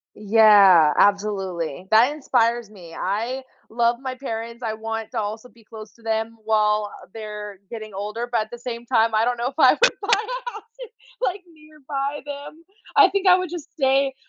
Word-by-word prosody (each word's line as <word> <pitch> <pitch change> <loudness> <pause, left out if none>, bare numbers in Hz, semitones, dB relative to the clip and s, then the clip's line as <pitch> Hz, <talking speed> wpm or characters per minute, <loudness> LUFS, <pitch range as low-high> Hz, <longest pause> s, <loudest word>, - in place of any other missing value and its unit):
Yeah, 200 -7 +6
absolutely. 190 -5 0
That 235 +6 +5
inspires 240 -6 0
me, 175 -5 -13
I 230 +7 -2 0.3
love 235 +1 +1
my 260 -1 -4
parents, 235 -2 -6
I 220 - -1
want 225 0 -5
to 225 - -1
also 220 +4 -5
be 230 0 -22
close 215 0 -11
to 230 - -23
them 225 0 -2
while 210 -1 +1 0.2
they're 210 -2 -8
getting 215 -2 -8
older, 210 +5 -4
but 240 - +1
at 215 - -10
the 240 - -8
same 240 -1 -7
time, 225 -2 +2
I 215 +1 +3
don't 245 +1 0
know 240 +1 -2
if 270 - -10
I - - +7
would - - +3
buy 400 - -6
a 485 +3 -4
house, 430 -2 -10 0.6
like, 380 -3 -1
nearby 295 -2 -6
them. 290 +3 -9 0.3
I 405 -3 +7
think 395 0 -1
I 360 - +8
would 365 -3 -4
just 345 -4 -8
stay 270 0 +2
230 Hz, 185 wpm, -22 LUFS, 215-275 Hz, 0.6 s, I